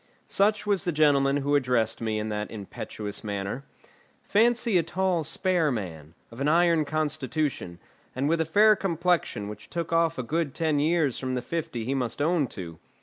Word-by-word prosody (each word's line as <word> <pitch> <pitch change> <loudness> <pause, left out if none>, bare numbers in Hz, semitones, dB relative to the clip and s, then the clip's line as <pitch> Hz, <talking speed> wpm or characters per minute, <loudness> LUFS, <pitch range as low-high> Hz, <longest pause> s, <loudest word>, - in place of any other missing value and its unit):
Such 210 +2 +1
was 200 -2 +1
the 175 - 0
gentleman 145 -3 +3
who 145 +1 -1
addressed 125 -6 +1
me 110 -1 -1
in 105 0 -3
that 105 0 -3
impetuous 105 0 -6
manner. 100 +5 -4 0.6
Fancy 230 -2 +3
a - - +3
tall, 180 0 0
spare 175 -1 +1
man, 85 - -6 0.2
of 115 +4 -9
an 140 - +1
iron 165 0 +4
constitution, 150 - -2 0.4
and 135 +3 0
with 165 +1 +2
a - - +1
fair 210 +7 +5
complexion 170 - 0
which 105 0 -9
took 170 -1 -3
off 165 -1 +2
a 130 - -2
good 155 +2 -2
ten 155 -3 +1
years 155 -3 +1
from 130 -1 -2
the 125 - -1
fifty 160 -9 -4
he 130 - -1
must 125 -3 -2
own 155 -1 +2
to. 85 -7 -8
145 Hz, 180 wpm, -27 LUFS, 115-170 Hz, 0.6 s, fair